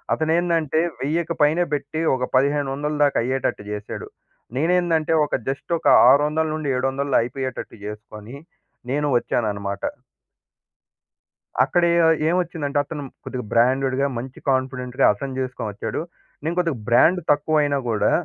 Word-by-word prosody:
అతను 160 0 -1
ఏందంటే, 165 -3 +1 0.2
1000కి 165 +4 -1
పైనే 155 +4 +3
పెట్టి 145 +2 -3
ఒక, 130 - -3
1500 140 +2 +1
దాకా 145 - +2
అయ్యేటట్టు 130 -3 -2
జేశాడు. 105 0 -6 0.5
నేనేందంటే 165 0 +1
ఒక, - - -2
జస్ట్ 140 +5 -5
ఒక - - -2 0.2
600 150 +3 +3
నుండి 155 -2 -4
700 135 +1 -1
అయిపోయేటట్టు 130 +1 -5
జేసుకొని 105 +2 -9 0.6
నేను 150 +2 0
వచ్చాననమాట. 100 -4 -2 1.8
అక్కడ 175 - +1
ఏ 170 - +3 0.3
ఏమొచ్చిందంటే 165 -5 -1
అతను 145 0 -6 0.2
కొద్దిగా 125 -1 -5
బ్రాండెడ్‌గా, 130 +3 +2
మంచి 125 +2 -7
కాన్ఫిడెంట్‌గా, 130 -1 0
అతను 130 +5 -6
జేసుకొనొచ్చాడు. 125 -5 -4 0.4
నేను 165 +3 -2
కొద్దిగా 165 -6 0
బ్రాండ్ 160 +9 +5
తక్కువైనా 150 -1 +2
గూడా, 110 -2 +1
140 Hz, 120 wpm, -22 LUFS, 125-155 Hz, 1.8 s, బ్రాండ్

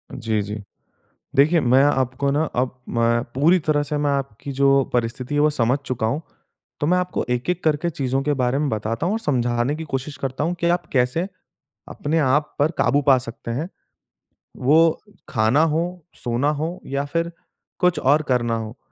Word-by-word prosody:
जी, 110 -2 -1
जी। 105 +1 -5 0.8
देखिए, 155 +5 +5
मैं 130 0 +4
आपको 135 -1 +1
ना 145 +3 +1
अब 125 0 -1 0.2
मैं 115 0 +2
पूरी 160 +8 +4
तरह 150 -2 +1
से 145 +1 -3
मैं 145 0 +1
आपकी 140 -1 -3
जो 135 0 +4
परिस्थिति 125 +3 -2
है, 145 - +2
वो 150 +1 +4
समझ 130 -1 +1
चूका 125 -4 -2
हूँ। 145 +8 -1 0.6
तो 145 - +1
मैं 180 +3 +3
आपको 180 -1 -2
एक-एक 145 +9 -1
करके 155 +2 +1
चीज़ों 135 -3 -1
के 145 +1 0
बारे 130 0 0
में 150 0 0
बताता 110 +6 -2
हूँ 185 - +1
और 225 - -2
समझाने 120 - 0
की 160 - -6
कोशिश 135 +1 -3
करता 135 +2 -2
हूँ 170 +2 0
कि 170 - +2
आप 175 +1 0
कैसे 130 +7 +1 0.6
अपने 155 +3 -1
आप 150 +1 +1
पर 145 +2 +3
काबू 145 +1 +3
पा 135 -2 +6
सकते 115 -1 -7
हैं। 140 +9 -2 0.9
वो 155 +5 +4 0.3
खाना 115 +5 +3
हो, 165 +2 -1 0.2
सोना 120 +4 +1
हो 155 +4 -3
या 140 +1 -2
फिर 165 +4 -2 0.5
कुछ 180 -3 +3
और 145 +2 +3
करना 120 -3 +1
हो। 110 +1 -6
140 Hz, 185 wpm, -22 LUFS, 125-155 Hz, 0.9 s, पा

